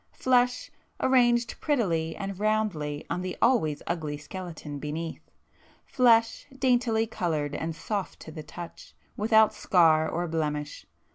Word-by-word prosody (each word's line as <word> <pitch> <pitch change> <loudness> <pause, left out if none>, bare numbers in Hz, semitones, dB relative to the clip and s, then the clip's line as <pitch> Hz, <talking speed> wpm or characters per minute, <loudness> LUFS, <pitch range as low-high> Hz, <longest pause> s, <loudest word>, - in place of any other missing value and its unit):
Flesh, 250 -1 +1 0.3
arranged 240 -2 +2
prettily 170 - 0
and 195 -1 -5
roundly 205 -9 -1
on 180 - -2
the 185 0 -5
always 160 - +2
ugly 155 -4 -3
skeleton 155 -2 -7
beneath,—flesh, 225 - -1
daintily 245 -4 +2
coloured 155 -9 -2
and 160 +1 -3
soft 200 +3 -4
to 160 - -9
the 155 - -7
touch, 170 +2 -10 0.2
without 220 0 +4
scar 160 -3 +3
or 175 +1 -2
blemish. 150 -2 -3
180 Hz, 120 wpm, -27 LUFS, 155-225 Hz, 0.3 s, without